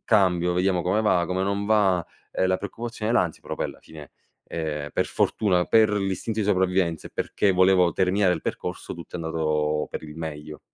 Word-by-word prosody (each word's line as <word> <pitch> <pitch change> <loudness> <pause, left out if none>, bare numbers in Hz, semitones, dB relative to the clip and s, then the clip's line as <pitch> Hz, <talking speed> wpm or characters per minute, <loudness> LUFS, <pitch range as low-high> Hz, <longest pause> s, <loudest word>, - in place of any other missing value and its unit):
cambio 90 -5 +2
vediamo 90 0 +1
come 95 +5 +1
va, 90 -5 +2
come 95 +1 -1
non 100 +1 -1
va;" 100 -5 +3 0.3
ehm, 95 - 0
la 95 0 +2
preoccupazione 110 +3 -5
e 120 - +2
l'ansia 85 -3 0
però - - -5
poi - - -2
alla - - -11
fine, 75 -3 -13 0.3
ehm, 75 -3 -4
per - - 0
fortuna, 90 -4 +1
per 110 -1 +5
l'istinto 105 +2 -1
di 100 - -1
sopravvivenza, 90 -4 +1
e - - -27
perché 100 - 0
volevo 90 -1 +4
terminare 95 0 +2
il 80 - -3
percorso, - - -5
tutto 85 +1 -8
è - - -6
andato 75 -2 0
per - - -5
il 75 0 -10
meglio. 75 -2 -7
90 Hz, 195 wpm, -25 LUFS, 80-100 Hz, 0.3 s, per